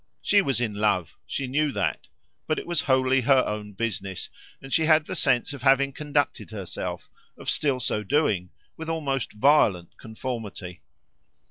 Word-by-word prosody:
She 205 - +5
was 135 - 0
in 115 -4 -1
love 100 -5 0
she 140 - -2
knew 145 +3 +1
that: - - -2 0.4
but 155 - 0
it - - -4
was 170 -2 0
wholly 130 -3 +3
her 130 +1 +4
own 105 -1 -4
business, 100 -3 -3 0.3
and 135 0 -8
she 160 - +4
had 155 -1 +5
the - - -5
sense 130 0 +2
of 140 - -8
having 140 +1 +4
conducted 145 0 -1
herself, 100 -5 -5 0.3
of - - -11
still 140 -4 +1
so 110 -3 -1
doing, 105 - +1 0.3
with 160 0 -7
almost 140 -6 -2
violent 105 - +3
conformity. 110 -6 -6
130 Hz, 160 wpm, -26 LUFS, 105-145 Hz, 0.4 s, She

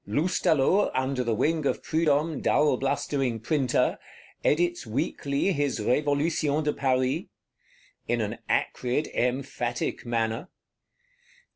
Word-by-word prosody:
Loustalot, 165 - +2
under 130 0 0
the 115 -2 0
wing 155 +7 +1
of - - -1
Prudhomme 155 -1 +1
dull 150 -2 +3
blustering 135 -3 -1
Printer, 130 0 +1 0.4
edits 175 -2 +1
weekly 140 - -1
his 145 -7 0
Révolutions 145 +4 +1
de 150 - 0
Paris; 130 -1 0 0.8
in - - +1
an - - -3
acrid, 130 +5 0
emphatic 125 -1 -2
manner. 115 +5 -2
140 Hz, 105 wpm, -27 LUFS, 125-155 Hz, 0.8 s, dull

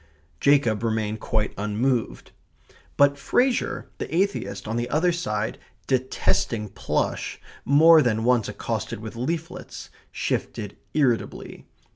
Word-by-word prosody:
Jacob 135 -7 +3
remained 110 -1 -1
quite 110 0 -1
unmoved. 110 - -1 0.7
But 140 0 +4
Fraser, 245 - +1
the - - -4
atheist, 170 - -1
on 110 - -2
the 120 +1 -1
other 165 +4 +2
side, 110 -11 -2 0.3
detesting 120 -4 0
plush, - - -2 0.3
more 160 +3 +7
than 110 -4 +1
once 120 -2 +2
accosted 115 0 -4
with 110 +1 -8
leaflets, 165 +8 -5 0.2
shifted 105 -2 -3 0.2
irritably. 130 -7 -1
120 Hz, 110 wpm, -25 LUFS, 110-145 Hz, 0.7 s, more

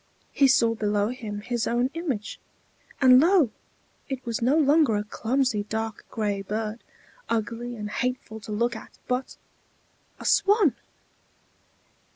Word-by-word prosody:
He 275 - +4
saw 230 -3 +4
below 210 -1 0
him 220 -5 -6
his 240 +1 -2
own 245 +3 +1
image; 285 -11 -4 0.6
and 255 -1 +8
lo! 330 - +4 0.6
it 265 -1 -5
was 235 -1 -3
no 260 +6 +3
longer 295 -5 +4
a 205 - 0
clumsy 235 +1 0
dark 220 -1 -4
gray 205 -3 -2
bird, 215 +3 -4 0.5
ugly 230 +2 -2
and 210 -2 -5
hateful 250 -3 -3
to 215 0 -9
look 235 +3 0
at, 220 - -11
but 255 +1 -2 0.8
a - - -9
swan! 395 - +4
235 Hz, 135 wpm, -26 LUFS, 215-260 Hz, 0.8 s, and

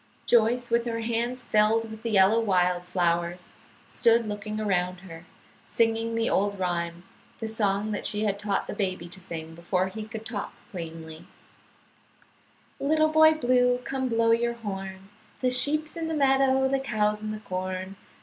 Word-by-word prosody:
Joyce, 240 +1 +3
with 235 0 +2
her 230 -1 -2
hands 235 +2 -1
filled 220 +1 +2
with 220 0 -9
the 230 - -3
yellow 200 +1 +5
wild 180 -4 +1
flowers, 175 0 -1 0.3
stood 230 -1 +2
looking 210 +1 -4
around 180 -3 -1
her, 175 -2 -11 0.4
singing 225 0 0
the 230 0 +1
old 200 +1 +1
rhyme, 175 -2 -2 0.3
the 225 - -5
song 210 -1 0
that 210 - -3
she 210 +1 -1
had 200 -2 0
taught 205 -1 -1
the - - -5
baby 185 -4 -2
to 185 - -8
sing 165 -3 -7
before 180 +3 -1
he 215 +3 -6
could 220 0 -8
talk 215 -3 -5 0.2
plainly: 165 -2 -8 1.5
"Little 310 +2 +2
Boy 315 0 +6
Blue, 250 -3 +2
come 260 0 -2
blow 230 0 +2
your 235 +1 +2
horn, 195 -4 -7 0.3
The 255 -1 +1
sheep's 300 +4 +1
in 330 -1 -3
the 320 - -2
meadow, 270 -2 +3
the 270 0 +1
cow's 210 -5 0
in 215 - -4
the 215 0 -4
corn. 185 0 -4
215 Hz, 165 wpm, -27 LUFS, 185-235 Hz, 1.5 s, Boy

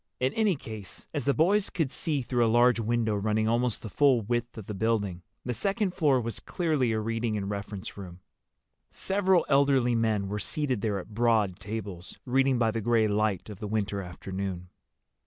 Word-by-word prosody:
In 130 +2 +1
any 215 -5 +2
case, 110 -8 -9
as 145 - -2
the 140 - +3
boys 195 +6 +3
could 160 -8 -1
see 145 -5 -1
through 120 -1 +1
a - - +3
large 120 +1 +4
window 115 -1 0
running 110 +2 0
almost 120 0 0
the - - -5
full 135 -5 +4
width 120 +2 -2
of 110 - -7
the 105 - -5
building, 100 -4 -1 0.2
the 125 - -1
second 195 - 0
floor 145 -7 +3
was 115 -1 -4
clearly 155 -9 0
a 110 - 0
reading 115 0 -1
and 100 0 -3
reference 100 -1 -6
room. 90 -3 -9 0.7
Several 190 -3 +1
elderly 140 -3 +3
men 110 -3 +1
were 105 +2 -3
seated 130 - -1
there 105 -2 0
at 100 +3 -8
broad 110 -5 +2
tables, 100 -4 -6
reading 135 +1 +2
by 115 -2 +2
the 115 0 -2
gray 115 0 +3
light 105 -3 0
of 105 -3 -9
the 105 - -4
winter 100 -1 -1
afternoon. 95 0 -5
115 Hz, 190 wpm, -28 LUFS, 105-130 Hz, 0.7 s, large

